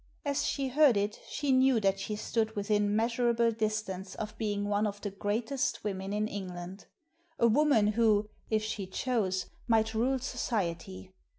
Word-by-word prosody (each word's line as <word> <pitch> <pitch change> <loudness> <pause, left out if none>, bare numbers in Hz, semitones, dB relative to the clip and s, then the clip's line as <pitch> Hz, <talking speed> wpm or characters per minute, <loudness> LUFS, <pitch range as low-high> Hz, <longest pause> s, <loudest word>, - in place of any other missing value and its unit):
As 280 -1 0
she 275 -2 -1
heard 275 -4 +5
it 205 +1 -1
she 290 -2 -1
knew 260 -2 +4
that 195 -1 +1
she 210 +2 -3
stood 220 +1 -1
within 205 0 +1
measurable 235 +1 +2
distance 215 -4 -3
of 215 -1 -5
being 205 -2 -1
one 205 +1 +1
of 205 0 -5
the 205 - -4
greatest 220 +7 -1
women 195 -1 -3
in 210 +1 0
England 185 -1 -7 0.3
— 335 +1 -40
a 235 - +5
woman 245 -2 +4
who, 215 -1 +3 0.2
if 215 -1 +1
she 215 -3 -4
chose, 190 -4 -1 0.2
might 220 -1 +2
rule 250 +4 +1
society. 195 -8 -3
215 Hz, 165 wpm, -30 LUFS, 205-235 Hz, 0.3 s, heard